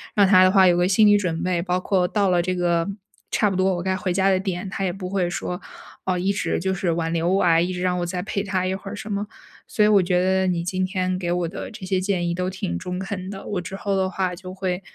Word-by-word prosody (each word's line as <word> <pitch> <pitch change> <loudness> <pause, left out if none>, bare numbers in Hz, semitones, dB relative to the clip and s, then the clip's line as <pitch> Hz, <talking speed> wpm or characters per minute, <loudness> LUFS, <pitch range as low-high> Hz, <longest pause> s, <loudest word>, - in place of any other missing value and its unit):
让 205 -2 +6
他 190 -1 +6
的 - - +5
话 190 -1 +6
有 175 -1 +4
个 175 0 +3
心 205 +3 +4
理 205 0 +6
准 175 -5 -2
备， 180 -2 0
包 180 0 0
括 185 -2 +1
到 200 +1 +1
了 175 -1 +3
这 185 +1 -1
个 175 -1 +1 0.4
差 210 - +2
不 195 - -3
多 190 0 +2
我 175 - -4
该 190 0 0
回 185 -2 -2
家 190 +1 +3
的 190 -1 +3
点， 190 0 -3
他 195 - -4
也 180 - -1
不 185 -1 -6
会 185 -2 0
说， 180 0 -4 0.5
哦， 185 -1 0
一 185 +3 +1
直 195 -4 -1
就 190 +1 0
是 190 -1 -1
挽 165 0 -2
留 165 +1 0
我 190 +2 +2
啊， 165 -2 +4
一 175 +2 0
直 180 - -4
让 180 -1 0
我 175 - -1
再 180 +1 -3
陪 200 +1 -2
他 190 -2 -1
一 185 - 0
会 195 +1 -6
儿 205 - -6
什 210 +1 -7
么。 205 +1 -2 0.4
所 210 - +1
以 - - +5
我 205 -2 +5
觉 180 0 +1
得 190 0 +2
你 175 -2 0
今 185 +1 -1
天 185 -1 -1
给 175 -2 -3
我 175 -1 0
的 195 - -6
这 210 -3 -9
些 185 0 0
建 185 -2 -1
议 - - 0
都 180 +1 -2
挺 180 - -3
中 180 - -5
肯 190 0 -5
的， 195 -1 -8
我 205 - -2
之 180 +2 -7
后 195 0 -1
的 190 -1 +1
话 185 -1 -1
就 185 +1 -9
会 185 -1 -2
185 Hz, 315 characters per minute, -23 LUFS, 180-195 Hz, 0.5 s, 让